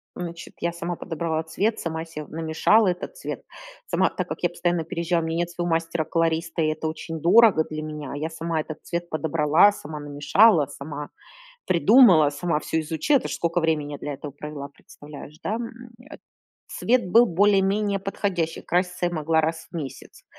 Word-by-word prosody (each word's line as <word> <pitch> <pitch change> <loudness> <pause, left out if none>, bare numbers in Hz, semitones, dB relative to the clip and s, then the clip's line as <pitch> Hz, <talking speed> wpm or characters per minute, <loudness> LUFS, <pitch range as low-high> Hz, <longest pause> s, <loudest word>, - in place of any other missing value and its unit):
значит, 170 -1 -7
я 170 0 -1
сама 170 0 -4
подобрала 165 -2 -2
цвет, 205 +7 -1
сама 160 -1 -4
се 155 -2 -8
намешала 165 +7 +2
этот 180 - -3
цвет. - - -6 0.4
Сама, - - +2
так - - -4
как - - -7
я 175 - +3
постоянно 175 -1 -1
переезжала, 170 0 -1
у - - -3
меня 165 +1 -2
нет 175 0 -1
своего 175 0 -3
мастера-колориста, 165 0 0
и 155 - +2
это 155 +1 -2
очень 160 0 -6
дорого 190 -1 +6
для 155 0 -4
меня, 150 -3 -6
я 155 +3 -3
сама 165 0 -3
этот 155 0 -5
цвет 170 0 -4
подобрала, 155 +4 +3
сама 150 -6 -8
намешала, 145 +5 +4
сама 145 +1 -7 0.6
придумала, 180 - +6
сама 160 +2 -1
всё 160 +1 -1
изучила. 160 - +1
Это - - -6
ж - - -3
сколько 170 +1 0
времени 150 -3 -1
для - - -7
я - - -5
этого 145 +1 -8
провела, 145 0 -7
представляешь, 145 +1 -13
да? 215 - -1
М, 235 +1 -8 0.2
э, 305 - -9 0.5
цвет 240 -6 0
был 235 +2 +7
более-менее 200 +1 +2
подходящий, 190 -4 -2
краситься 180 0 0
я 175 - -2
могла 160 0 +1
раз 160 +1 -3
в - - -7
месяц. 135 -5 -8
165 Hz, 180 wpm, -24 LUFS, 155-180 Hz, 0.6 s, был